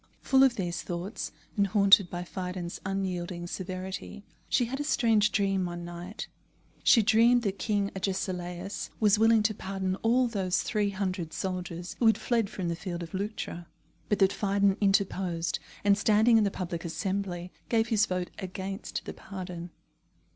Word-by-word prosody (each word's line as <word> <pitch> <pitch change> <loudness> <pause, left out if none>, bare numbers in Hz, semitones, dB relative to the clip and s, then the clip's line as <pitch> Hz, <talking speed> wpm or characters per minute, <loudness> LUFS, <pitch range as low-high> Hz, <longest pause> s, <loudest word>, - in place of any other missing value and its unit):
Full 265 -1 +4
of 265 -3 +5
these 175 -4 -2
thoughts, 175 +4 -4 0.2
and 200 -2 +3
haunted 200 -2 +6
by 175 0 -4
Phidon's 180 -1 -5
unyielding 185 -2 -3
severity, 185 +2 -6 0.3
she 245 - +3
had 265 +4 -4
a - - 0
strange 225 -7 +3
dream 195 -2 +1
one 175 0 -6
night. 175 +4 -7 0.6
She 230 - +6
dreamed 235 +2 +5
that 200 -2 -2
King 205 -2 0
Agesilaus 185 -1 -3
was 210 -1 +4
willing 225 -1 +5
to 215 0 +2
pardon 190 -1 -3
all 245 +4 +3
those 190 -5 0
three 210 -1 0
hundred 185 -4 -3
soldiers 180 -2 -4
who 235 - +4
had 220 - +5
fled 230 -4 0
from 185 -5 -4
the 170 - -1
field 175 -1 -5
of 165 - -10
Leuctra; 190 -4 -4 0.4
but 210 - +2
that 195 0 +4
Phidon 200 -1 +2
interposed, 190 -4 +1 0.2
and 200 0 +5
standing 220 +3 +4
in 210 - +3
the - - +2
Public 175 -3 -4
Assembly, 180 +1 -3 0.2
gave 225 -1 +2
his 220 0 +3
vote 180 -1 -2
against 190 +1 -5
the - - -5
pardon. 180 -3 -7
195 Hz, 160 wpm, -29 LUFS, 180-210 Hz, 0.6 s, haunted